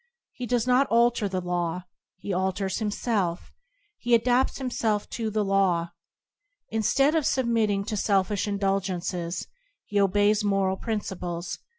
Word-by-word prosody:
He 245 Hz, -, -6 dB
does 245 Hz, -1 st, +1 dB
not 255 Hz, +2 st, +3 dB
alter 235 Hz, -2 st, +2 dB
the 185 Hz, -1 st, -2 dB
law; 175 Hz, 0 st, -2 dB, 0.3 s
he 195 Hz, +1 st, -4 dB
alters 190 Hz, +1 st, -1 dB
himself; 205 Hz, -4 st, -1 dB, 0.5 s
he 240 Hz, 0 st, +3 dB
adapts 245 Hz, +3 st, +2 dB
himself 225 Hz, -5 st, -1 dB
to 225 Hz, -2 st, -2 dB
the 215 Hz, -1 st, 0 dB
law. 185 Hz, -4 st, +1 dB, 0.8 s
Instead 270 Hz, +7 st, +2 dB
of 320 Hz, -2 st, +2 dB
submitting 230 Hz, -7 st, +1 dB
to 220 Hz, -, -3 dB
selfish 200 Hz, 0 st, +1 dB
indulgences, 190 Hz, -3 st, -2 dB, 0.4 s
he 205 Hz, -, 0 dB
obeys 205 Hz, +2 st, +3 dB
moral 195 Hz, -2 st, +1 dB
princi 210 Hz, -4 st, -3 dB
ples. 175 Hz, 0 st, -4 dB
205 Hz, 130 wpm, -26 LUFS, 190-230 Hz, 0.8 s, not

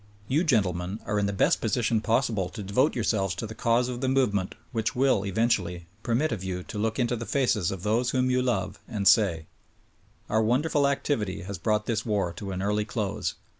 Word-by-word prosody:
You, 150 Hz, +6 st, +2 dB
gentlemen, 95 Hz, -, 0 dB
are 105 Hz, 0 st, 0 dB
in 100 Hz, -, +1 dB
the -, -, -1 dB
best 100 Hz, -, +2 dB
position 115 Hz, -1 st, +1 dB
possible 110 Hz, -5 st, +1 dB
to 105 Hz, -, -7 dB
devote 125 Hz, +10 st, +2 dB
yourselves 100 Hz, -6 st, 0 dB
to 115 Hz, -, -4 dB
the 110 Hz, -, -7 dB
cause 115 Hz, +2 st, +1 dB
of 125 Hz, -1 st, -5 dB
the 130 Hz, -, 0 dB
movement 115 Hz, -8 st, +1 dB, 0.2 s
which 115 Hz, -2 st, -1 dB
will, 130 Hz, -6 st, +3 dB
eventually, 95 Hz, -5 st, 0 dB, 0.2 s
permit 125 Hz, +7 st, 0 dB
of 105 Hz, -5 st, -3 dB
you 90 Hz, -1 st, -3 dB
to 105 Hz, -, -6 dB
look 110 Hz, +1 st, -1 dB
into 120 Hz, -2 st, +1 dB
the 115 Hz, 0 st, -6 dB
faces 120 Hz, -10 st, +1 dB
of 95 Hz, -2 st, -5 dB
those 115 Hz, +4 st, +1 dB
whom 130 Hz, 0 st, +1 dB
you 125 Hz, 0 st, +2 dB
love 100 Hz, -6 st, -1 dB
and 105 Hz, -4 st, -1 dB
say: 90 Hz, -7 st, +4 dB, 0.8 s
"Our 110 Hz, +1 st, +2 dB
wonderful 140 Hz, +6 st, +2 dB
activity 135 Hz, -9 st, -1 dB
has 95 Hz, -1 st, -6 dB
brought 105 Hz, -1 st, 0 dB
this 115 Hz, -2 st, 0 dB
Avar 100 Hz, -6 st, -1 dB
to 100 Hz, -, -6 dB
an 95 Hz, 0 st, -3 dB
early 105 Hz, +1 st, +1 dB
close. 105 Hz, -2 st, -3 dB
110 Hz, 205 wpm, -27 LUFS, 100-125 Hz, 0.8 s, say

